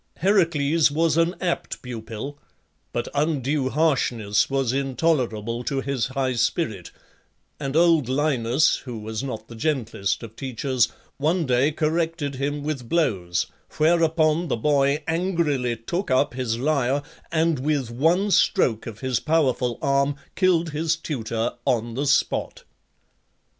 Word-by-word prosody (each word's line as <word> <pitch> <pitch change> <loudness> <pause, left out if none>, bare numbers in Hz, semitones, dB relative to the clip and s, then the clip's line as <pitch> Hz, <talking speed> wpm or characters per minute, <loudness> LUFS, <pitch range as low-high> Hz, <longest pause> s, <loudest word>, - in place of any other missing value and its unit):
Heracles 165 -5 +3
was 155 +1 +1
an 165 +2 +2
apt 175 -2 -3
pupil; 120 +3 -6 0.5
but 120 - -2
undue 145 -2 0
harshness 125 -9 +1
was 135 -3 0
intolerable 125 -5 0
to 135 -2 -1
his 135 -4 -1
high 130 0 -1
spirit, 110 - -1 0.7
and 135 -1 -3
old 165 -6 +4
Linus, 130 -1 +2
who 125 -3 -7
was 110 +1 -4
not 115 -5 -5
the 120 - -11
gentlest 115 -6 -1
of 115 -1 -9
teachers, 130 -1 0 0.3
one 160 +4 +1
day 130 +3 +2
corrected 160 -1 -1
him 140 +2 -3
with 140 -6 -4
blows, 95 - +1 0.3
whereupon 160 0 +3
the 130 - -1
boy 140 +3 +2
angrily 160 -8 0
took 170 - -3
up 130 -1 +2
his 120 -3 -2
lyre, 140 0 +1 0.3
and, 160 -2 +2
with 140 -3 -1
one 170 - +2
stroke 120 - +2
of 115 +1 -8
his 130 -3 0
powerful 135 -6 +1
arm, 140 +1 +2 0.2
killed 170 -3 +2
his 160 +2 0
tutor 115 -8 -3
on 120 -3 0
the 140 +4 -2
spot. - - +1
140 Hz, 130 wpm, -24 LUFS, 120-160 Hz, 0.7 s, old